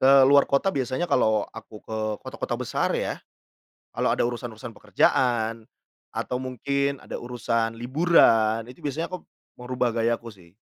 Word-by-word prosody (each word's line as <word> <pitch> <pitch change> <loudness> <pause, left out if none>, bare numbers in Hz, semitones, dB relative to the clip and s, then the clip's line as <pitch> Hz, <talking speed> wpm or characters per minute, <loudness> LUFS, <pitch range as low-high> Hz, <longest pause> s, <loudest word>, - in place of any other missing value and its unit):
Ke 135 0 +7
luar 140 +1 +6
kota 140 +8 +2
biasanya 135 +5 -1
kalau 110 -1 +2
aku 110 -1 -11
ke 110 - -6 0.3
kota-kota - - -4
besar - - -1
ya, - - -2 0.8
kalau - - 0
ada - - +1
urusan-urusan 120 -1 -6
pekerjaan 115 +2 +1 0.5
atau 125 - -2
mungkin 140 +2 -1
ada - - -7
urusan 115 -2 -1
liburan, 115 -5 +3
itu 125 - -13
biasanya 150 +4 -2
aku 185 - -4 0.4
merubah 125 -1 -1
gayaku 115 0 -1
sih. 85 -3 -19
120 Hz, 140 wpm, -25 LUFS, 115-135 Hz, 0.8 s, Ke